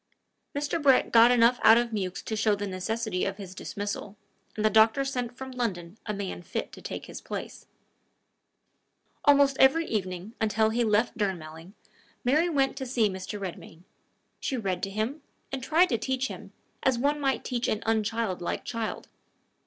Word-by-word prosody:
Mr. 295 +3 -1
Brett 270 -3 +4
got 230 +1 +8
enough 245 0 +4
out 225 - +8
of 240 0 0
Mewks 190 -3 -3
to 220 - -3
show 215 -1 +2
the 205 0 -4
necessity 200 +1 -2
of 195 0 -2
his 190 -3 -8
dismissal, 205 +1 -5 0.4
and 215 - -1
the - - +6
doctor 220 +5 +5
sent 250 -2 -3
from 265 0 -7
London 205 -6 -4
a - - 0
man 200 -3 -4
fit - - -4
to - - -12
take - - -6
his - - -9
place. - - -7 1.6
Almost 280 -2 +5
every 320 +5 +5
evening, 185 - -3
until 220 0 +2
he 240 +2 +1
left 220 +1 +1
Durnmelling, 170 -3 -4 0.5
Mary 305 +8 +3
went 275 -4 +1
to 265 - -4
see 235 -4 +2
Mr. 190 +2 -6
Redmain. 175 -3 -8 0.6
She 265 - -2
read 190 -5 -2
to 195 - -2
him, 220 +9 -3 0.3
and 270 -1 -3
tried 325 +7 +3
to 235 - 0
teach 265 0 -1
him, - - -9 0.3
as 260 -2 +2
one 290 +4 +1
might 270 -1 -1 0.2
an 215 - -1
unchildlike 220 -4 -1
child. 230 -2 -4
225 Hz, 170 wpm, -28 LUFS, 200-260 Hz, 1.6 s, got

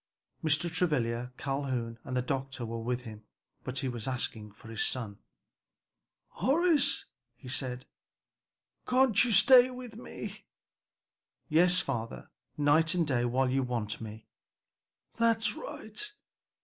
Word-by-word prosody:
Mr. 155 +2 +2
Travilla, 125 -9 0
Calhoun 130 -5 -3
and 130 - -3
the 125 - +1
doctor 135 -1 -3
were 115 0 -5
with 125 +2 -2
him, 110 -3 -10 0.4
but 130 +1 -5
he 130 - -1
was 120 -2 -5
asking 115 -4 -3
for 110 +2 -15
his 115 -1 -1
son. 110 -6 -3 1.1
"Horace," 320 +3 +3 0.3
he 130 - -14
said, 125 0 -3 1.0
"can't 255 -4 +4
you 245 - 0
stay 245 +5 +8
with 250 -3 -9
me?" 240 - -8 1.0
"Yes, 175 +3 +5
father, 115 -4 -5 0.3
night 155 +4 +3
and 170 -2 +2
day 125 -4 +1
while 125 +1 +1
you 135 +1 +2
want 115 -4 -3
me." 110 0 -8 0.9
"That's 230 -1 +2
right! 420 -4 -7
130 Hz, 125 wpm, -30 LUFS, 120-180 Hz, 1.1 s, stay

